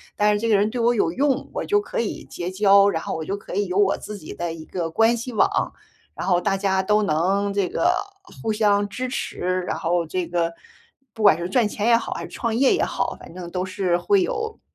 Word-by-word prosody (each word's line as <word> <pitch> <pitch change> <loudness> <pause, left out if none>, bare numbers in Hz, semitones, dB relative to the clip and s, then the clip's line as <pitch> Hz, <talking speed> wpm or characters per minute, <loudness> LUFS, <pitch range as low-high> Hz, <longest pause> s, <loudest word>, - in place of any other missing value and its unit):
但 210 0 +3
是 205 - 0
这 230 - -1
个 215 - +4
人 205 +2 +2
对 245 - -4
我 235 +1 +3
有 165 -6 +1
用， 275 +5 0
我 - - -3
就 415 0 +2
可 480 +2 -4
以 - - -3
结 175 +1 -5
交， 200 0 +5
然 160 -4 -2
后 - - -3
我 160 - -5
就 200 - -2
可 200 - -10
以 205 0 +1
有 180 +2 -2
我 200 -1 +3
自 210 -1 -8
己 155 - -9
的 170 -1 -4
一 160 -1 -9
个 170 -3 -3
关 225 +7 +3
系 245 +1 -6
网， - - +1 0.4
然 - - -4
后 180 -2 +3
大 195 - 0
家 190 -1 +1
都 210 +2 +2
能 195 +5 +1
这 200 -2 +1
个 350 - +2 0.5
互 220 -1 -1
相 205 -1 +2
支 255 +4 -4
持， 185 -7 -2
然 - - -2
后 170 0 0
这 180 +1 -3
个 170 -1 -1 0.6
不 220 - -5
管 195 -6 +7
是 175 +1 -4
赚 230 0 +3
钱 210 +2 -2
也 235 - +6
好， - - -4
还 - - -6
是 - - -8
创 230 -2 -2
业 265 +2 +4
也 - - 0
好， - - -2
反 - - -12
正 175 -1 -7
都 180 +1 -2
是 185 -2 0
会 400 - +2
有 445 +2 -3
200 Hz, 270 characters per minute, -23 LUFS, 180-230 Hz, 0.6 s, 管